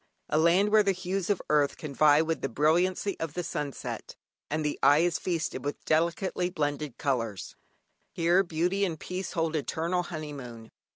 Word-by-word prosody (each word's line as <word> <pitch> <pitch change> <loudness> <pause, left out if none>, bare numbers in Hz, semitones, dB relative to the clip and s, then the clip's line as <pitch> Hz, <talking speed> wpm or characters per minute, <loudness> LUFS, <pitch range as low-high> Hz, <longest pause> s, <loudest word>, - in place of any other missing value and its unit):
A 155 - +2
land 175 +5 +4
where 215 0 +6
the 200 -1 +2
hues 185 +1 -3
of 205 - 0
earth 145 -2 +2
can 150 -3 -7
vie 150 +2 +5
with 165 0 -2
the 135 - -1
brilliancy 175 - +1
of 165 -2 -4
the 180 - -2
sunset, 150 -5 -5 0.3
and 155 +1 -1
the 150 - -2
eye 140 +2 +6
is 175 -2 +1
feasted 165 -7 -2
with 145 +1 -5
delicately 170 +3 +1
blended 150 -5 -3
colours. 115 -8 -2 0.6
Here 175 +3 +3
Beauty 180 +3 0
and 165 -5 -1
Peace 185 +1 -5
hold 165 -1 0
eternal 165 +4 -1
honeymoon. 140 -9 -8
160 Hz, 170 wpm, -28 LUFS, 145-180 Hz, 0.6 s, where